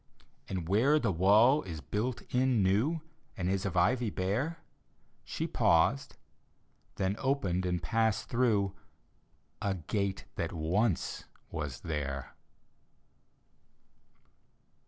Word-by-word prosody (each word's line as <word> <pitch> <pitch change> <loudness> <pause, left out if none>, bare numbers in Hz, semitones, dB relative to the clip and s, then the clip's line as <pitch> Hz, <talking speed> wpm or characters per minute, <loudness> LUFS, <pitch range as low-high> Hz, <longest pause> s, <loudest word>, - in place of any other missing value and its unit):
And 90 -4 -3
where 120 - +4
the 145 - +1
wall 105 - +5
is 85 -4 -7
built 115 +6 -3
in 125 -4 +3
new 115 - +2 0.4
And 90 - -2
is 95 +1 0
of 95 - -3
ivy 115 +6 +3
bare 105 - -1 0.7
She - - -3
paused 115 +12 +2 0.4
— - - -40
then 95 0 0
opened 95 -10 0
and 90 -1 -1
passed 110 -2 +1
through 110 -6 +1 0.9
A 100 -1 0
gate 95 - -2
that - - -2
once 90 +5 0 0.3
was 75 -5 -4
there. 70 -4 -4
100 Hz, 110 wpm, -31 LUFS, 90-120 Hz, 0.9 s, wall